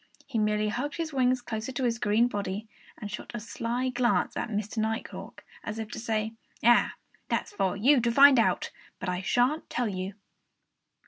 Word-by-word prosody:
He 240 Hz, -5 st, -2 dB
merely 210 Hz, 0 st, +1 dB
hugged 270 Hz, +7 st, -3 dB
his 325 Hz, -2 st, -3 dB
wings 255 Hz, -1 st, +2 dB
closer 220 Hz, +2 st, -4 dB
to 260 Hz, -, -2 dB
his 235 Hz, -2 st, +1 dB
green 215 Hz, +3 st, +3 dB
body, 205 Hz, -1 st, -4 dB, 0.3 s
and 210 Hz, -2 st, -7 dB
shot 210 Hz, -, -6 dB
a -, -, -2 dB
sly 235 Hz, +3 st, -2 dB
glance 245 Hz, -1 st, +1 dB
at -, -, -2 dB
Mr. 215 Hz, +1 st, -3 dB
Nighthawk, 220 Hz, +1 st, -4 dB, 0.2 s
as 210 Hz, -, -5 dB
if 220 Hz, -1 st, -5 dB
to -, -, -5 dB
say, 220 Hz, -1 st, -1 dB, 0.3 s
"Ah! 240 Hz, +2 st, +5 dB, 0.3 s
That's -, -, -1 dB
for 195 Hz, -, 0 dB
you 260 Hz, +5 st, +5 dB
to 235 Hz, 0 st, +1 dB
find 275 Hz, +1 st, +8 dB
out! 190 Hz, -5 st, +1 dB, 0.3 s
But 185 Hz, -, -3 dB
I 180 Hz, 0 st, -1 dB
shan't 245 Hz, -, +1 dB
tell 245 Hz, -3 st, -1 dB
you!" 190 Hz, 0 st, -4 dB
230 Hz, 185 wpm, -28 LUFS, 210-250 Hz, 0.3 s, find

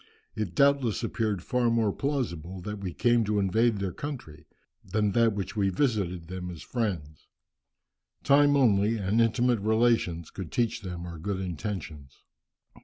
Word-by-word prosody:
It 100 Hz, -6 st, -3 dB
doubtless 140 Hz, -7 st, +3 dB
appeared 105 Hz, -5 st, -1 dB
far 125 Hz, -2 st, +1 dB
more 115 Hz, -3 st, +2 dB
plausible 95 Hz, -, -3 dB
that 105 Hz, +3 st, -5 dB
we 95 Hz, -2 st, -4 dB
came 120 Hz, +5 st, +2 dB
to 105 Hz, 0 st, 0 dB
invade 110 Hz, +3 st, +2 dB
their 95 Hz, -2 st, -3 dB
country, 120 Hz, -, -7 dB, 0.4 s
than 105 Hz, -1 st, 0 dB
that 115 Hz, 0 st, +3 dB, 0.2 s
we 100 Hz, -2 st, +2 dB
visited 95 Hz, -, -1 dB
them 90 Hz, 0 st, -5 dB
as 85 Hz, -3 st, -8 dB
friends. 90 Hz, -, -4 dB, 1.0 s
Time 145 Hz, +1 st, +5 dB
only, 110 Hz, -3 st, +3 dB
and 105 Hz, +3 st, +1 dB
intimate 120 Hz, +1 st, +2 dB
relations, 110 Hz, -6 st, +1 dB
could 95 Hz, -5 st, -7 dB
teach 115 Hz, -2 st, 0 dB
them 90 Hz, -3 st, -6 dB
our 85 Hz, -2 st, -8 dB
good 95 Hz, +3 st, -3 dB
intentions." 85 Hz, -6 st, -6 dB
105 Hz, 145 wpm, -28 LUFS, 90-115 Hz, 1.0 s, Time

